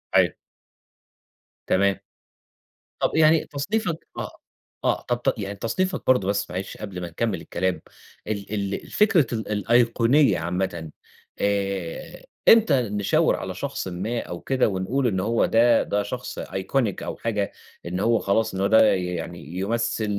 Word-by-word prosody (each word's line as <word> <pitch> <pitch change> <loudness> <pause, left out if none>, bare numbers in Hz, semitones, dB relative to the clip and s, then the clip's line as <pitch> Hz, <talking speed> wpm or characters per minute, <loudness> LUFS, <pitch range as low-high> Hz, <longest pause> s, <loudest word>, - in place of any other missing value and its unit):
أيوه. - - +5 1.3
تمام. 100 0 +3 1.1
طب - - +1
يعني 160 0 +5
تصنيفك 170 +4 -2
آه، - - -3 0.5
آه، - - +1
طب 120 0 -2
ت 135 - +2
يعني 100 0 -4
تصنيفك 180 - -1
برضو 125 -7 +4
بس 100 0 0
معلش 95 +2 -5
قبل 100 -4 -6
ما 85 - -4
نكمل 95 0 -2
الكلام 95 +2 -2 0.5
ال 105 -1 -4
ال 100 -1 -1
الفكرة 200 - +3
ال 110 -1 -3
الأيقونية 120 - +3
عامةً 85 -1 -3 0.5
آآ، 100 -4 -2 0.3
امتى 185 - +6
نشاور 105 -3 +1
على - - -5
شخصٍ - - -4
ما 100 +7 -3
أو 85 - -6
كده 130 -3 +1
ونقول 110 +8 0
إنّ 95 -4 0
هو 115 +5 +2
ده 115 0 +4
ده 105 0 -1
شخص 125 +4 -6
iconic 100 +2 -2
أو - - -5
حاجة 105 -3 -1 0.3
إن 90 +2 -3
هو 115 +2 +3
خلاص 105 +2 +1
إنّه 95 0 -1
هو - - +3
ده 110 +1 +6
يعني 85 -3 -4
يمثل 115 +2 0
105 Hz, 145 wpm, -24 LUFS, 95-120 Hz, 1.3 s, امتى